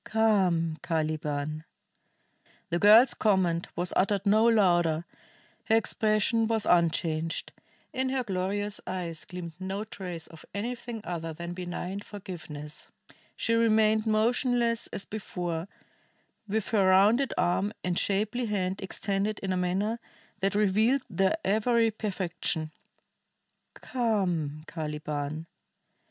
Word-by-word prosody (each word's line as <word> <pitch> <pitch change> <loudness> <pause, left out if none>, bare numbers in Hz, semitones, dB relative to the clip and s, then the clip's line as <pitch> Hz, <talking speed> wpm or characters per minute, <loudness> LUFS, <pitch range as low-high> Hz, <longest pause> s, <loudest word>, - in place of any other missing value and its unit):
"Come, 185 -8 +2
Caliban!" 155 -2 -2 1.1
The 170 - +1
girl's 220 +6 +7
command 185 -5 +1
was 175 +1 -1
uttered 200 +1 +2
no 215 +3 +5
louder, 175 -7 +3 0.6
her 220 - +3
expression 220 0 +2
was 220 -2 +1
unchanged; 165 -1 +1 0.4
in 260 0 0
her 260 -1 0
glorious 200 +1 -2
eyes 175 -4 -4
gleamed 180 -2 -7
no 190 +2 -3
trace 180 -6 -7
of 165 -2 -13
anything 235 +1 -4
other 165 -3 -4
than 170 +2 -6
benign 180 +2 -4
forgiveness; 165 -8 -8 0.5
she 230 - 0
remained 220 -1 +3
motionless 235 +1 +2
as - - -2
before, 175 -5 -4 0.8
with 215 0 -1
her 200 -4 +3
rounded 210 +8 +5
arm 190 +4 +1
and 180 -1 +1
shapely 215 +5 0
hand 190 -2 -1
extended 200 +2 -2
in 190 -1 0
a - - 0
manner 195 +6 0 0.4
that 195 +1 0
revealed 215 +6 +3
their 190 - +2
every 225 +2 +3
perfection. 180 -6 -2 1.0
"Come, 180 - -1
Caliban!" 150 -1 -4
195 Hz, 115 wpm, -28 LUFS, 170-220 Hz, 1.1 s, girl's